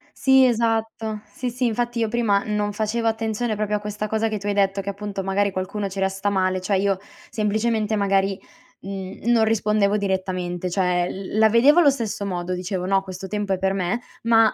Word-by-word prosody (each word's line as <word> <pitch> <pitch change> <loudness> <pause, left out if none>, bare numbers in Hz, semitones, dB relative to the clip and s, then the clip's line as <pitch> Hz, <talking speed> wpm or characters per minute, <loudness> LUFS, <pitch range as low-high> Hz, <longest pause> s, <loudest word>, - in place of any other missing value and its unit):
Sì 265 -1 +5
esatto. 225 -2 0
Sì, 250 -1 -4
sì 250 +1 -2
infatti 240 +1 -1
io 225 - +1
prima 215 -3 +1
non 210 -1 -1
facevo 220 +2 -1
attenzione 225 0 -1
proprio 210 0 -1
a - - -6
questa 210 0 -4
cosa 220 +1 0
che 215 -1 -2
tu 205 +1 -6
hai 205 - +1
detto, 195 0 +1
che 200 - -5
appunto 200 -1 -5
magari 200 +1 +1
qualcuno 195 +2 -3
ci 195 0 -6
resta 195 +1 0
male. 185 -1 0
Cioè 195 +1 +1
io 195 -1 +1 0.3
semplicemente 215 0 0
magari, 195 -1 +1 0.4
mhmm, 195 +2 -7
non 230 -2 +4
rispondevo 210 -2 +2
direttamente, 185 -2 -2
cioè 180 -1 +1
l 195 +2 -5
la 220 0 +6
vedevo 270 +9 +6
allo 295 -4 +6
stesso 225 -6 -2
modo, 180 -1 -3
dicevo: 180 0 -3
"No 195 0 +2
questo 190 0 -7
tempo 205 0 -2
è - - 0
per 190 0 +1
me", 195 +5 -1 0.2
ma 225 -1 +5
205 Hz, 200 wpm, -23 LUFS, 195-220 Hz, 0.4 s, la